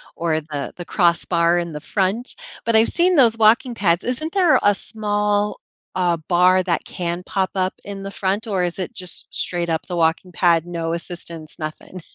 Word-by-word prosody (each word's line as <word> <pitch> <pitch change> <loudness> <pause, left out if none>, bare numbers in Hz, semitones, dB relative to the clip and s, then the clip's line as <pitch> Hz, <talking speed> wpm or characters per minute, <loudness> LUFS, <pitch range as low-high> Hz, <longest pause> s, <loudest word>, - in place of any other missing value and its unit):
or 165 -2 0
the 150 -2 -5
the 175 - -7
crossbar 170 -2 +2
in 170 -2 -4
the 150 - -5
front, 205 +5 -1 0.3
but 230 - +1
I've 220 +1 +5
seen 360 +1 +2
those 235 -6 +5
walking 230 +3 +4
pads, 175 -5 +1
isn't 310 +6 -3
there 365 -5 +4
a 205 - +5
small, 210 0 -1 0.4
uh, 180 -2 +2
bar 180 +1 +5
that 175 -3 -1
can 175 0 -4
pop 190 0 -1
up 185 -1 0
in 200 -1 -7
the 195 - -6
front, 200 +3 -1
or 195 -4 0
is 175 -1 -2
it 185 - -4
just 180 -1 -8
straight-up 170 -2 -2
the 180 - -4
walking 165 +2 +1
pad, 170 -2 +3
no 165 -1 -3
assistance, 170 -2 -6
nothing? 155 +4 -7
185 Hz, 185 wpm, -21 LUFS, 170-210 Hz, 0.4 s, I've